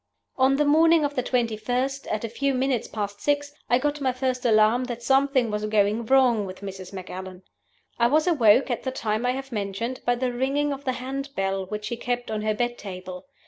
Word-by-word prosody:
"On 265 +1 +3
the 295 +2 +2
morning 320 +1 +5
of 290 - -2
the 255 - 0
21st, 250 +3 -1
at 215 +1 -2
a - - -1
few 270 +4 -1
minutes 255 -2 0
past 205 -1 -5
six, 290 0 0 0.2
I 245 - +5
got 290 +2 -1
my 260 -2 +2
first 255 0 -2
alarm 220 +2 +4
that 240 -1 -6
something 270 -2 +2
was 210 0 -2
going 215 +2 +1
wrong 245 -6 +4
with 185 +1 -9
Mrs. 190 -2 -7
Macallan. 185 -1 -8 0.6
"I 235 - +5
was 305 +5 +3
awoke 260 - +4
at 240 - -2
the 260 - -3
time 225 -2 -2
I 250 - +2
have 270 +1 -6
mentioned 215 +4 -3
by 245 - +2
the 250 0 -2
ringing 280 +4 0
of 275 +1 -9
the 260 - 0
hand 270 +2 -5
bell 195 -1 -1
which 210 +1 -5
she 235 +2 -3
kept 245 -1 -3
on 215 -1 -2
her 215 0 0
bed 240 +2 -2
table. 185 +1 -8
245 Hz, 215 wpm, -25 LUFS, 210-270 Hz, 0.6 s, morning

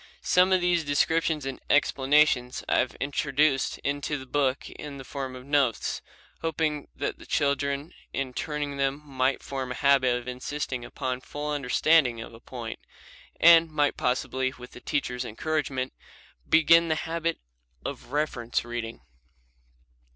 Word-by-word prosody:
Some 180 +1 +4
of 185 -1 +4
these 175 -2 +2
descriptions 155 +1 +1
and 135 -1 -5
explanations 135 -3 +3
I - - +3
have 125 - 0
introduced 140 0 +1
into 145 +1 -1
the 130 - -9
book 135 -1 0
in 145 -2 -8
the 135 - -8
form 130 -1 -5
of 125 0 -10
notes, 140 -5 +1 0.4
hoping 155 -2 -1
that - - -3
the - - -12
children 140 +1 0 0.2
in 130 -2 -3
turning 150 +1 -3
to 140 - -7
them 135 +1 0
might 135 -1 0
form 130 -2 -4
a - - -3
habit 130 -3 +4
of 125 0 -8
insisting 130 0 -4
upon 130 0 -4
full 150 +3 -5
understanding 140 -2 +3
of 115 - -8
a 115 - -12
point, 120 -2 -7 0.6
and 165 0 +8
might 150 -2 +1
possibly, 130 +1 0
with 125 0 -11
the 125 - -12
teacher's 125 -4 -2
encouragement, 130 +1 -2 0.6
begin 165 +1 +6
the 160 - +1
habit 165 0 -2 0.5
of - - -6
reference 135 -6 -1
reading. 120 -1 -5
140 Hz, 150 wpm, -27 LUFS, 130-150 Hz, 0.6 s, and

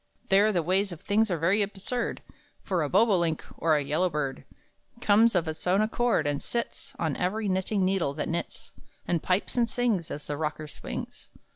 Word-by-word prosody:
There 200 +3 +5
the 175 -5 0
ways 190 +4 +1
of 170 - -8
things 215 +2 +2
are 175 - 0
very 185 +6 +2
absurd; 205 +5 -3 0.4
For 185 -4 0
a 150 - -1
bobolink, 180 -5 +2
or 160 -2 +2
a 145 - +1
yellow 160 +6 +1
bird, 140 -4 -3 0.5
Comes 225 0 +4
of 170 -2 +1
its 160 +3 -5
own 185 +2 +4
accord, 225 -5 +1
and 145 -1 -1
sits 235 0 -4
On 160 -5 -1
every 205 +4 -1
knitting 190 +1 +1
needle 185 -7 0
that 150 - -2
knits, 170 +1 -4 0.4
And 170 -3 +1
pipes 185 +6 0
and 235 -1 +3
sings, 225 -9 0
As 145 - -6
the 145 - -3
rocker 155 0 -3
swings. - - -7
185 Hz, 185 wpm, -27 LUFS, 160-210 Hz, 0.5 s, There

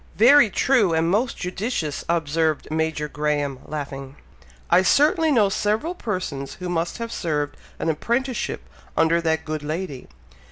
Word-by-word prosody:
'" - - -28 0.2
"Very 285 -7 +7
true! 220 -5 +3
and 165 +1 +2
most 230 +5 +1
judicious!" 180 - -3
observed 160 -2 0
Major 160 -1 -1
Graham, 145 -2 -1
laughing. 140 -2 -6 0.5
"I 180 - +5
certainly 305 - +3
know 225 -7 +4
several 215 - 0
persons 180 - -4
who 180 -1 -6
must 170 -1 -1
have 230 -1 -5
served 150 -6 -2 0.2
an - - -3
apprenticeship 235 - -1 0.3
under 165 +1 +3
that 160 -1 0
good 155 -1 -3
lady. 150 -2 -5
165 Hz, 145 wpm, -23 LUFS, 150-215 Hz, 0.5 s, Very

